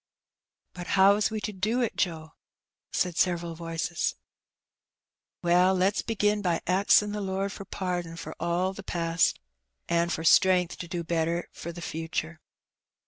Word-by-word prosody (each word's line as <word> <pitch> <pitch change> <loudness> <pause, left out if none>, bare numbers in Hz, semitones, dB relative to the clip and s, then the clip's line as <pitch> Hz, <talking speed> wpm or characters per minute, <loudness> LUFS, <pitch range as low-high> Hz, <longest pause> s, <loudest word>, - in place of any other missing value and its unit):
But 175 -1 -8
how 195 +1 +7
is 210 - +1
we 220 0 -3
to 210 +1 -4
do 215 +6 0
it, 235 - -1
Joe?" 160 -4 -2 0.6
said 180 -2 -1
several 170 -2 +1
voices. 165 0 -2 1.3
Well^ 180 +2 +4
lefs 190 +3 +2
begin 210 -2 0
by 175 -4 +1
axin' 200 +3 +4
the 210 0 -3
Lord 195 0 -2
for 200 - -8
pardon 175 -4 -3
for - - -7
all 175 +2 0
the 210 - -8
past, 170 -3 0 0.5
an' 170 0 +1
for 160 -1 -2
strength 180 +1 +4
to 170 - -6
do 175 0 -4
better 170 +1 -1
for 170 - -7
the 170 0 -9
future." 160 +1 -4
175 Hz, 150 wpm, -27 LUFS, 170-195 Hz, 1.3 s, how